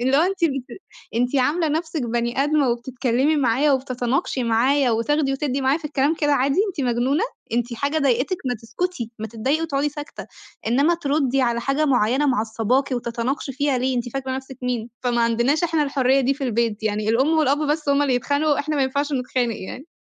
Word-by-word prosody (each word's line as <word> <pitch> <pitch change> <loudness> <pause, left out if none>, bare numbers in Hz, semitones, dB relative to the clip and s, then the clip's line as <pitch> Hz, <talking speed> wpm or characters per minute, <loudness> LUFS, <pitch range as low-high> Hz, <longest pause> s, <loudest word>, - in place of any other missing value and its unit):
اللي 260 +3 +2
هو 300 - +5
أنتِ 375 0 0
بت 275 +2 -3 0.3
أنتِ 245 +4 +1
عاملة 305 +5 +2
نفْسِك 315 -1 -2
بَني 235 +3 0
آدمة 295 -2 +2
وبتتكلّمي 255 +4 0
معايا، 275 +2 +2
وبتتناقشي 255 0 -1
معايا 250 +4 +2
وتاخدي 270 +5 +1
وتدّي 275 0 -1
معايا 270 +4 +2
في 320 - -19
الكلام 295 +1 +1
كده 295 -2 +1
عادي، 275 +3 +2
أنتِ 365 -6 -5
مجنونة؟ 260 - +1 0.3
أنتِ 240 +1 -1
حاجة 285 +6 -1
ضايقتِك؟ 275 +5 +1
ما 250 -1 0
تسكتي 235 - -4
ما 220 - -4
تضايقي 250 +8 -1
وتقعُدي 295 -2 0
ساكتة، 295 +1 -8 0.4
إنّما 280 +9 +3
تردّي 275 -4 0
على 235 -1 +1
حاجة 275 +4 0
معيّنة 255 +2 +2
معصّباكِ 245 +2 0
وتتناقشي 245 +3 -2
فيها 280 -1 0
ليه، 255 +1 0
أنتِ 240 0 -2
فاكرة 260 +1 -3
نفْسِك 265 0 -9
مين؟ 240 -2 -2
فما 240 -1 +1
عندناش 235 +8 +2
إحنا 325 -2 +1
الحرية 275 -1 +2
دي 270 +2 +1
في 280 - -5
البيت، 230 -3 -1
يعني 215 0 -1
الأم 265 +8 +3
والأب 285 -1 +3
بس 300 0 -1
هُم 280 +1 +3
اللي 270 -3 +2
يتخانقوا، 285 +4 +1
إحنا 305 +1 -1
ما 280 - +2
ينفعش 280 +3 -1
نتخانق 250 -3 -1
يعني. 255 +9 -8
265 Hz, 190 wpm, -22 LUFS, 240-290 Hz, 0.4 s, هو